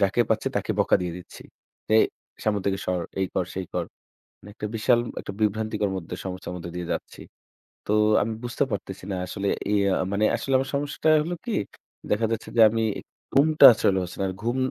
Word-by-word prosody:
যাকে 100 Hz, +4 st, +2 dB
পাচ্ছি 110 Hz, -1 st, +1 dB
তাকে -, -, -1 dB
বকা -, -, +4 dB
দিয়ে 90 Hz, -2 st, -3 dB
দিচ্ছি। 90 Hz, -, -12 dB, 0.5 s
"এই -, -, +7 dB, 0.4 s
সামনে 105 Hz, -2 st, +1 dB
থেকে 95 Hz, -1 st, +1 dB
সর, 90 Hz, -1 st, 0 dB, 0.2 s
এই 95 Hz, -, +1 dB
কর, 90 Hz, -, +1 dB
সেই 95 Hz, -1 st, -4 dB
কর"। -, -, -1 dB, 0.6 s
মানে 105 Hz, -, -13 dB
একটা 105 Hz, -2 st, -5 dB
বিশাল 120 Hz, +2 st, +3 dB, 0.2 s
একটা -, -, -7 dB
বিভ্রান্তিকর 105 Hz, -1 st, 0 dB
মধ্যে 90 Hz, -1 st, -5 dB
সমস্যার 90 Hz, -1 st, -5 dB
মধ্যে 85 Hz, -1 st, -7 dB
দিয়ে 90 Hz, -1 st, -4 dB
যাচ্ছি। -, -, -7 dB, 0.7 s
তো 105 Hz, -, +1 dB, 0.3 s
আমি 110 Hz, +2 st, -1 dB
বুঝতে 120 Hz, +3 st, -1 dB
পারতেছি 95 Hz, -2 st, -5 dB
না 95 Hz, -, -1 dB
আসলে 100 Hz, +2 st, -3 dB, 0.3 s
ইয়া 100 Hz, -1 st, +3 dB
আ -, -, +1 dB
মানে 100 Hz, +2 st, +2 dB
আসলে 135 Hz, -, -2 dB
আমার 135 Hz, +1 st, -2 dB
সমস্যাটা 145 Hz, +2 st, 0 dB
হলো 175 Hz, +2 st, -3 dB
কি? 235 Hz, -, -1 dB, 0.6 s
দেখা 105 Hz, +2 st, +2 dB
যাচ্ছে 115 Hz, -, -3 dB
যে -, -, +7 dB
আমি 115 Hz, +1 st, -1 dB, 0.5 s
ঘুমটা 155 Hz, +3 st, +6 dB
আসলে 100 Hz, -3 st, +1 dB
হচ্ছে 90 Hz, -, -8 dB
না। 95 Hz, -, +1 dB
আর -, -, -4 dB
ঘুম 120 Hz, +2 st, 0 dB
105 Hz, 195 wpm, -25 LUFS, 95-115 Hz, 0.7 s, এই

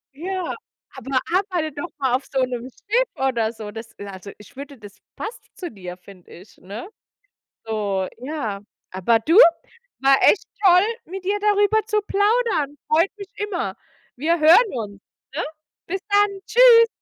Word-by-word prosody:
Ja, 370 Hz, +3 st, -3 dB, 0.4 s
aber 265 Hz, 0 st, -1 dB
arbeite 360 Hz, -5 st, 0 dB
doch 290 Hz, +5 st, -6 dB
mal 265 Hz, -3 st, 0 dB
auf 260 Hz, -, 0 dB
so 265 Hz, -, 0 dB
'nem 250 Hz, 0 st, -4 dB
Schiff 470 Hz, -, -1 dB
oder 235 Hz, -4 st, 0 dB
so. 215 Hz, -2 st, -8 dB
Das 225 Hz, +1 st, -9 dB
also, 200 Hz, 0 st, -9 dB
ich 210 Hz, -, -17 dB
würde 280 Hz, 0 st, -9 dB
das 205 Hz, -2 st, -13 dB, 0.2 s
passt 445 Hz, -, -6 dB, 0.2 s
zu 350 Hz, -4 st, -6 dB
dir, 180 Hz, -3 st, -9 dB
finde 185 Hz, -1 st, -17 dB
ich, 185 Hz, +5 st, -15 dB
ne? 205 Hz, -, -8 dB, 0.8 s
So, 200 Hz, -4 st, -2 dB
ja 250 Hz, -7 st, -4 dB, 0.3 s
Aber 190 Hz, +5 st, +2 dB
du, 325 Hz, -, +2 dB, 0.6 s
war 270 Hz, 0 st, +5 dB
echt 405 Hz, -, +5 dB, 0.2 s
toll, 360 Hz, 0 st, +7 dB, 0.2 s
mit 370 Hz, +2 st, -8 dB
dir 410 Hz, +2 st, 0 dB
darüber 415 Hz, +1 st, +3 dB
zu 425 Hz, -2 st, +1 dB
plaudern. 405 Hz, -, +1 dB
Freut 330 Hz, +5 st, +3 dB
mich 400 Hz, -2 st, -9 dB
immer. 355 Hz, -, -3 dB, 0.4 s
Wir 325 Hz, +5 st, 0 dB
hören 350 Hz, +9 st, +6 dB
uns, 205 Hz, -5 st, -6 dB, 0.3 s
ne? 325 Hz, -, -1 dB, 0.4 s
Bis 385 Hz, +2 st, -3 dB
dann. 405 Hz, -1 st, +2 dB
Tschüss. 470 Hz, -2 st, +7 dB
290 Hz, 155 wpm, -22 LUFS, -, 0.8 s, toll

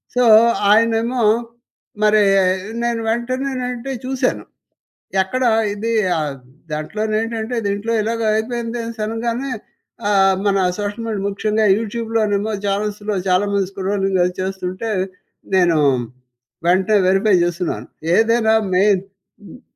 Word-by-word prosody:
So 250 Hz, -, +3 dB, 0.5 s
ఆయనేమో 230 Hz, +3 st, +2 dB, 0.8 s
మరి 215 Hz, 0 st, +5 dB, 0.6 s
నేను 235 Hz, -1 st, 0 dB
వెంటనే 255 Hz, +4 st, -1 dB, 0.2 s
అంటే 250 Hz, +2 st, -5 dB
చూశాను. 265 Hz, 0 st, -1 dB, 0.8 s
ఎక్కడ 255 Hz, +7 st, -2 dB, 0.3 s
ఇది 225 Hz, +3 st, -3 dB, 0.3 s
ఆ!దాంట్లో 150 Hz, +6 st, -6 dB, 0.2 s
ఏంటంటే 225 Hz, +1 st, -3 dB
దీంట్లో 200 Hz, +3 st, -2 dB
ఇలాగ 230 Hz, +2 st, -2 dB
అయిపోయింది 235 Hz, +1 st, -2 dB
అనేసి 230 Hz, -1 st, -7 dB
అనగానే 235 Hz, +4 st, -3 dB, 0.6 s
ఆహ్, 195 Hz, -1 st, +4 dB
మన 200 Hz, -1 st, +2 dB, 0.2 s
సోషల్ 205 Hz, +2 st, -4 dB
మీడియా 205 Hz, -3 st, -3 dB
ముఖ్యంగా 215 Hz, +2 st, 0 dB
యూట్యూబ్‌లోనేమో 220 Hz, -2 st, -1 dB
చానెల్స్‌లో 205 Hz, +1 st, -2 dB
చాలా 185 Hz, +2 st, +2 dB
మంది 195 Hz, -2 st, +1 dB
స్క్రోలింగ్ 195 Hz, -1 st, -1 dB
అది 180 Hz, 0 st, -1 dB
చేస్తుంటే 190 Hz, +3 st, -4 dB, 0.7 s
నేను 175 Hz, -3 st, +3 dB, 0.9 s
వెంటనే 190 Hz, +4 st, +3 dB
వెరిఫై 195 Hz, +1 st, +3 dB
చేస్తున్నాను. 175 Hz, 0 st, -3 dB, 0.3 s
ఏదైనా 225 Hz, 0 st, +3 dB, 0.2 s
మెయిన్ 195 Hz, 0 st, +3 dB, 0.4 s
హ్మ్. 245 Hz, -, -13 dB
210 Hz, 105 wpm, -19 LUFS, 195-230 Hz, 0.9 s, మరి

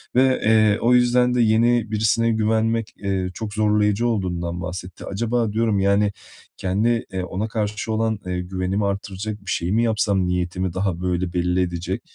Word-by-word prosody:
ve, 130 Hz, 0 st, +3 dB
eee, 110 Hz, -1 st, +4 dB
o 120 Hz, +2 st, +3 dB
yüzden 125 Hz, 0 st, +4 dB
de 125 Hz, -, +2 dB
yeni 115 Hz, 0 st, +3 dB
birisine 110 Hz, +2 st, +2 dB
güvenmek, 110 Hz, 0 st, 0 dB
eee, 95 Hz, -2 st, -2 dB
çok 105 Hz, +1 st, -6 dB
zorlayıcı 105 Hz, +1 st, +2 dB
olduğundan 90 Hz, -5 st, -2 dB
bahsetti. 90 Hz, +1 st, -7 dB
Acaba, 115 Hz, +1 st, -1 dB
diyorum, 110 Hz, -2 st, +1 dB
yani, 100 Hz, +1 st, +2 dB, 0.5 s
kendi, 110 Hz, +5 st, 0 dB
eee, 95 Hz, -1 st, -2 dB
ona 100 Hz, +4 st, -3 dB
karşı 105 Hz, -1 st, -3 dB
olan, 110 Hz, -1 st, 0 dB
eee, 90 Hz, -1 st, -2 dB
güvenimi 95 Hz, +2 st, -2 dB
artıracak 100 Hz, +1 st, -4 dB
bir 90 Hz, -, -3 dB
şey 85 Hz, +2 st, -1 dB
mi 115 Hz, +2 st, +2 dB
yapsam? 100 Hz, -4 st, +1 dB
Niyetimi 90 Hz, 0 st, -2 dB
daha 95 Hz, -2 st, -2 dB
böyle 90 Hz, -1 st, -1 dB
belli 90 Hz, +1 st, +1 dB
edecek... 85 Hz, -1 st, -3 dB
105 Hz, 165 wpm, -22 LUFS, 90-110 Hz, 0.5 s, eee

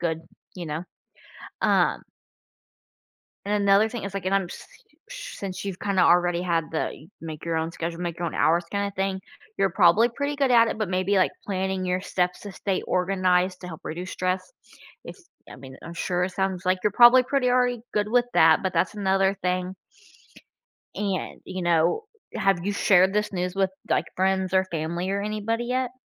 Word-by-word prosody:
good. 160 Hz, -2 st, -1 dB, 0.4 s
You 175 Hz, -2 st, -6 dB
know, 155 Hz, +2 st, -4 dB, 0.8 s
um -, -, +2 dB, 1.4 s
And 205 Hz, 0 st, 0 dB
another 200 Hz, +2 st, +5 dB
thing 240 Hz, -1 st, -6 dB
is, 200 Hz, -1 st, -5 dB
like 195 Hz, -2 st, -5 dB
and 190 Hz, -, 0 dB
I'm 195 Hz, -1 st, +1 dB
s 175 Hz, -, -10 dB, 0.4 s
since 195 Hz, -, -7 dB
you've 195 Hz, -3 st, -4 dB
kinda 195 Hz, -2 st, +1 dB
already 175 Hz, 0 st, +3 dB
had 170 Hz, -3 st, -1 dB
the 160 Hz, -, -1 dB
you 155 Hz, -, -15 dB
make 160 Hz, -1 st, -7 dB
your 165 Hz, -1 st, -1 dB
own 160 Hz, +1 st, -2 dB
schedule, 170 Hz, 0 st, -5 dB
make 175 Hz, -1 st, -4 dB
your 175 Hz, -, -3 dB
own 165 Hz, -, -4 dB
hours 170 Hz, +2 st, +2 dB
kinda 200 Hz, 0 st, -1 dB
thing, 190 Hz, 0 st, -2 dB, 0.4 s
you're 195 Hz, 0 st, +2 dB
probably 185 Hz, +7 st, +4 dB
pretty 285 Hz, +4 st, -3 dB
good 275 Hz, -2 st, +1 dB
at 230 Hz, -1 st, +6 dB
it, -, -, -3 dB
but 215 Hz, -4 st, -1 dB
maybe, 185 Hz, +2 st, 0 dB
like, 185 Hz, -, +3 dB
planning 190 Hz, -1 st, -2 dB
your 180 Hz, 0 st, -1 dB
steps 180 Hz, -2 st, -1 dB
to 205 Hz, -, -8 dB
stay 190 Hz, 0 st, -2 dB
organized 185 Hz, 0 st, +1 dB
to 180 Hz, -, -7 dB
help 160 Hz, -3 st, -9 dB
reduce 180 Hz, +4 st, -6 dB
stress. 185 Hz, -, -2 dB, 0.5 s
It's 375 Hz, -2 st, -12 dB, 0.2 s
I -, -, -10 dB
mean, 130 Hz, 0 st, -12 dB
I'm 170 Hz, -, -8 dB
sure 180 Hz, +1 st, -1 dB
it 185 Hz, -, -2 dB
sounds 190 Hz, -1 st, -2 dB
like 185 Hz, 0 st, +2 dB
you're 210 Hz, -, +2 dB
probably 240 Hz, +4 st, +8 dB
pretty 255 Hz, -1 st, +1 dB
already 245 Hz, -1 st, +2 dB
good 210 Hz, 0 st, +1 dB
with 245 Hz, +1 st, +3 dB
that, 160 Hz, +2 st, +5 dB
but 190 Hz, -2 st, -1 dB
that's 175 Hz, +5 st, 0 dB
another 195 Hz, -1 st, +1 dB
thing. 180 Hz, 0 st, -1 dB, 1.2 s
And, 195 Hz, -3 st, -3 dB
you 185 Hz, 0 st, -6 dB
know, 170 Hz, -, +2 dB, 0.3 s
have 195 Hz, -3 st, +1 dB
you 205 Hz, -, 0 dB
shared 190 Hz, -1 st, +4 dB
this 210 Hz, 0 st, 0 dB
news 180 Hz, 0 st, -2 dB
with, 195 Hz, -1 st, +2 dB, 0.2 s
like, -, -, +1 dB
friends 190 Hz, 0 st, 0 dB
or 190 Hz, 0 st, +4 dB
family 170 Hz, +3 st, -3 dB
or 200 Hz, -, -1 dB
anybody 215 Hz, +3 st, -2 dB
yet? 250 Hz, 0 st, -1 dB
190 Hz, 190 wpm, -25 LUFS, 175-205 Hz, 1.4 s, probably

